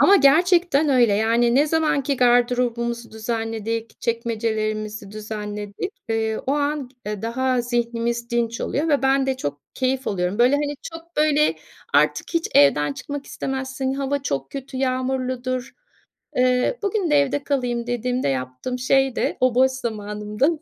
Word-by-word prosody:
Ama 400 - +7
gerçekten 335 0 +4
öyle, 245 -6 +4
yani, 230 +3 +2
ne 285 +3 +4
zaman 310 -2 +1
ki 275 +1 -1
gardırobumuzu 240 -1 +1
düzenledik, 225 0 -3
çekmecelerimizi 215 -3 -2
düzenledik, 210 - -5 0.2
eee, 220 -1 0
o 270 - +2
an, 290 -2 -1 0.2
eee, 210 -1 -4
daha 255 +2 0
zihnimiz 235 0 -2
dinç 235 -1 -1
oluyor 305 +4 -1
ve 290 -3 +2
ben 270 0 +3
de 265 -1 0
çok 145 - -4
keyif 260 0 -1
alıyorum. 185 +1 -1
Böyle, 245 +3 +5
hani, 290 0 -1
çok, 330 +1 -10
böyle, 300 0 +3 0.4
artık - - +3
hiç 335 - +1
evden 145 +1 +5
çıkmak 285 - -6
istemezsin, 265 0 -3
hava 275 0 -1
çok 135 - -3
kötü, 270 -1 -7
yağmurludur, 255 -1 -1 0.6
eee, 250 - +2
"Bugün 400 -4 0
de - - +4
evde 285 +1 -1
kalayım" 245 -4 -1
dediğimde 245 - -1
yaptığım 130 - -3
şey 270 0 +2
de - - 0
o 255 -1 +3
boş 260 +1 +5
zamanımda 210 0 -2
250 Hz, 145 wpm, -22 LUFS, 225-275 Hz, 0.6 s, Ama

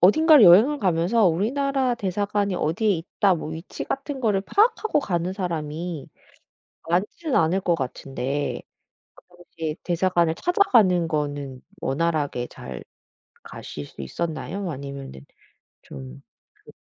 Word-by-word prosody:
어딘가를 300 - +7
여행을 220 +12 +7
가면서 185 +3 +2
'우리나라 255 - +1
대사관이 205 -1 -1
어디에 180 +6 0
있다.' 185 +2 +1
뭐 155 - -5
위치 160 +4 -7
같은 275 0 -4
거를 210 -5 +2
파악하고 425 - +2
가는 180 -6 -2
사람이 165 -3 -4 0.8
많지는 210 - -1
않을 165 +4 +2
것 175 - +2
같은데 135 0 -3 0.6
그 - - -19
당시에 165 -3 -6
대사관을 175 -2 +1
찾아가는 220 - +3
거는 145 -4 -3 0.2
원활하게 145 -4 -1
잘 - - -9 0.6
가실 75 - -8
수 70 - -11
있었나요? 160 - -4
아니면은 140 - -8 0.6
좀 65 -1 -10 0.4
그 - - -13
175 Hz, 285 characters per minute, -24 LUFS, 150-210 Hz, 0.8 s, 어딘가를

